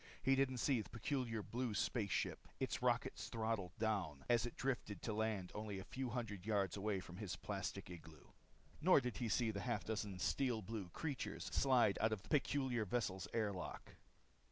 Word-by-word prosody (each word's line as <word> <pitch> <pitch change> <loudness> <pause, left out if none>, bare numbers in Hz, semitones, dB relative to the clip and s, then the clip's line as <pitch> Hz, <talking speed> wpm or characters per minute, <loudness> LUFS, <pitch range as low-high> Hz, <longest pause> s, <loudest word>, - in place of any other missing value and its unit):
He 135 +1 +5
didn't 135 -1 +2
see 125 -1 +3
the 105 - -10
peculiar 115 -3 -1
blue 120 -1 -2
space 105 -1 +1
ship, - - -1
its - - -1
rockets - - +1
throttled 110 -6 -1
down, 95 -11 0
as 120 0 +4
it - - -7
drifted 120 -7 -2
to 110 - -1
land 105 -4 0
only 105 -1 -3
a 95 - -5
few 130 +5 -3
hundred 115 -6 -3
yards 100 -3 +1
away 100 -1 0
from 90 -1 -9
his 100 -3 -3
plastic 100 0 -3
igloo. 80 -3 -11 0.5
Nor 180 -1 +7
did 125 -3 -3
he 120 -3 -1
see 115 0 +2
the 100 -2 -3
half 120 -1 -1
dozen 105 -3 -2
steel 115 +4 +1
blue 105 -2 -4
creatures 145 - -3
slide 125 -7 +4
out 110 - +4
of 105 -3 -2
the - - -15
peculiar 130 -5 +2
vessel's 100 -4 -1
airlock. 100 -5 -2
110 Hz, 180 wpm, -41 LUFS, 100-125 Hz, 0.5 s, Nor